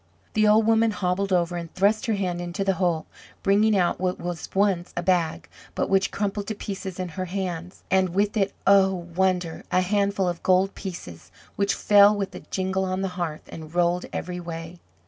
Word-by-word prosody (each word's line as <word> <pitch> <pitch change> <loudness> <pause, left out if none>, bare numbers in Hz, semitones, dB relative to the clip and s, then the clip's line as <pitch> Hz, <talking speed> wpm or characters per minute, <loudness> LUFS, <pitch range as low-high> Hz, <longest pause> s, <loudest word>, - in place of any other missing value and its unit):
The 215 0 +3
old 215 +1 +5
woman 225 0 +4
hobbled 195 -1 -1
over 175 -1 +1
and 170 -1 -6
thrust 215 +6 +2
her 225 - +1
hand 180 -3 -2
into 175 +2 -3
the 195 0 +2
hole, 170 -3 +1 0.4
bringing 205 +2 +4
out 180 -1 +1
what 185 -1 -1
was 175 -2 -5
once 195 -3 +1
a 175 - -1
bag, 170 -3 0 0.3
but - - -1
which 195 -1 +3
crumpled 205 0 -3
to 220 - -3
pieces 195 -2 -6
in 180 -1 -3
her 185 +3 -4
hands, 180 -1 -5
and 190 -1 +3
with 200 +4 0
it 200 -2 +1
oh, 195 -1 +5 0.2
wonder! 180 -3 0
a 185 - +3
handful 200 0 +1
of 175 -1 -3
gold 190 +1 +3
pieces, 90 - -8 0.2
which 200 0 +1
fell 205 0 +6
with 195 -1 -3
a - - -7
jingle 190 0 -2
on 185 0 -2
the 195 - -1
hearth, 175 -4 -4
and 160 0 -10
rolled 175 0 +2
every 180 0 -4
way. 165 0 -7
185 Hz, 195 wpm, -25 LUFS, 175-200 Hz, 0.4 s, fell